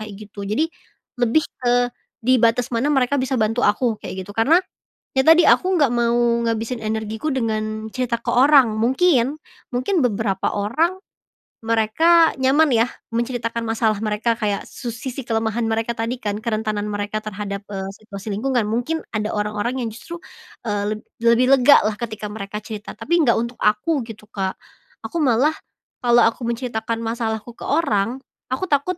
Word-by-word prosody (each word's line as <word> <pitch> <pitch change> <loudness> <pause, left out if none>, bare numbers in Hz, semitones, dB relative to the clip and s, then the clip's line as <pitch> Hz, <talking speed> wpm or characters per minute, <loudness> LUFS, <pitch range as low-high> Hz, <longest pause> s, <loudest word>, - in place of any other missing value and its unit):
kayak 215 -1 -7
gitu 200 -1 -8
jadi, 230 +10 +1 0.6
lebih 245 +7 +3 0.2
ke 245 0 +2 0.3
di 255 0 +4
batas 235 +2 +2
mana 240 +5 +1
mereka 270 -1 +2
bisa 260 0 -1
bantu 220 +2 +1
aku 220 +2 +2
kayak 190 0 -6
gitu 205 - -9
karena, 245 +10 +4 0.6
ya 265 - +3
tadi 325 +2 +7
aku 375 +1 +3
gak 280 - +5
mau 235 -1 +1 0.3
ngabisin 230 +2 -2
energiku 220 +4 -3
dengan 215 -3 -2
cerita 245 -2 -2
ke - - -4
orang 270 -2 +6
mungkin 260 +3 +2 0.4
mungkin 335 +10 +1
beberapa 200 -4 -1
orang, 265 - +1 0.7
mereka 230 +10 +4
nyaman 280 +3 +4
ya 230 +1 +3 0.3
menceritakan 235 -1 -2
masalah 225 -1 +1
mereka 215 +2 0
kayak 205 -2 -1
su 245 - -7
sisi 245 +4 -5
kelemahan 225 0 0
mereka 225 +1 0
tadi 230 +2 -2
kan 210 -3 -3
kerentanan 215 -2 -2
mereka 205 +1 -3
terhadap, 205 -1 -5
eee, 195 -1 -4
situasi 205 0 -7
lingkungan 245 +3 0
mungkin 245 +9 -2
ada 215 0 -1
orang-orang 210 +4 -2
yang 230 - -2
justru, 340 +10 -8 0.5
eee, 205 -1 -1
leb - - -9 0.2
lebih 235 +2 +4
legalah 245 -4 +5
ketika 215 -3 -5
mereka 210 -1 -6
cerita 215 -2 -7
tapi 340 +2 +1
nggak 245 -7 +4
untuk 235 +1 -3
aku 215 +9 +2
gitu, 215 -2 -10
Kak, 190 -3 -2 0.5
aku 340 - -3
malah, 270 +3 +3 0.5
kalau 240 -1 +5
aku 225 +2 0
menceritakan 230 -2 -3
masalahku 225 0 -3
ke - - -22
orang, 245 -7 +1 0.3
aku 260 +9 -1
takut, 315 +3 0
230 Hz, 160 wpm, -21 LUFS, 215-255 Hz, 0.7 s, tadi